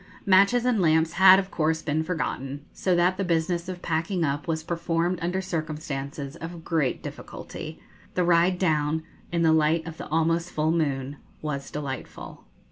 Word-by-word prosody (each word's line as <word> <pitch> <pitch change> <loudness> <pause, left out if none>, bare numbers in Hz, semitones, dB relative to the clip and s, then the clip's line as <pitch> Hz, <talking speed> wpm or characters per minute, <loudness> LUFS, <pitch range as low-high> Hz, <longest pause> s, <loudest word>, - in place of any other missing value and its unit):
Matches 200 +6 +5
and 240 -5 +2
lamps 160 -1 +3
had 190 +1 +8
of 195 0 -2
course 160 0 0
been 155 0 0
forgotten; 145 -4 -3
so 185 -2 +1
that 180 +2 +3
the 195 - 0
business 170 0 0
of 180 -1 -6
packing 170 +2 0
up 145 +1 -1
was 160 -1 -1
performed 170 +1 -1
under 180 +3 -1
circumstances 150 -4 -4
of 165 0 -8
great 155 -7 0
difficulty. - - -8 0.4
The 180 - +2
ride 175 +1 +3
down, 155 -3 +1 0.3
in 170 -1 +1
the 160 -1 +5
light 160 +1 +2
of 165 -1 -7
the - - -7
almost 165 +2 +1
full 155 +1 0
moon, 140 -4 -1 0.3
was 140 -3 -3
delightful. 140 -3 -7
165 Hz, 165 wpm, -26 LUFS, 155-175 Hz, 0.4 s, had